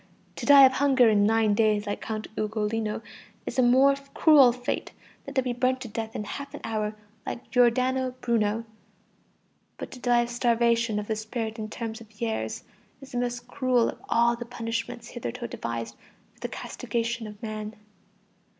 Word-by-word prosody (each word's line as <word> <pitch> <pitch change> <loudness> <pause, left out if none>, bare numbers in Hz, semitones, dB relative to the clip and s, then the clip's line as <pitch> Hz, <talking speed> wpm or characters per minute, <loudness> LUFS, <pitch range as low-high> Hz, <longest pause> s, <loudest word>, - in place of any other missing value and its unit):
To - - -5
die 280 -1 +10
of 260 - +5
hunger 265 -3 +4
in 205 -1 +4
nine 220 -1 +3
days 210 -1 +2
like 205 - -3
Count 215 -1 -4
Ugolino 215 0 -2 0.4
is - - -3
a - - +7
more 260 +3 +5 0.2
cruel 290 -6 +7
fate 245 +1 -4 0.3
than 275 - -7
to 265 - +3
be 250 -1 -1
burnt 255 +1 +1
to 250 - -5
death 225 0 -5
in - - -3
half 280 +6 -7
an - - -9
hour 215 -1 -2 0.3
like 235 -1 -7
Giordano 255 +2 +2
Bruno; 225 -1 0 1.1
but - - -7
to 255 - -10
die 240 -1 +3
of 240 - -3
starvation 235 -2 +2
of 210 - -2
the 220 - -1
spirit 220 +1 -4
in 215 - -3
a - - -6
term 225 +1 -5
of 220 -1 -13
years 225 -2 -2 0.4
is 270 -1 -13
the 245 - -2
most 245 0 -3
cruel 255 -3 +2
of - - -9
all 235 0 +3
the 240 - -6
punishments 230 0 -5
hitherto 240 0 -5
devised 115 - -5 0.4
for - - -28
the - - -4
castigation 230 -1 -3
of 210 -1 -11
man. 215 -1 -5
235 Hz, 180 wpm, -27 LUFS, 215-250 Hz, 1.1 s, die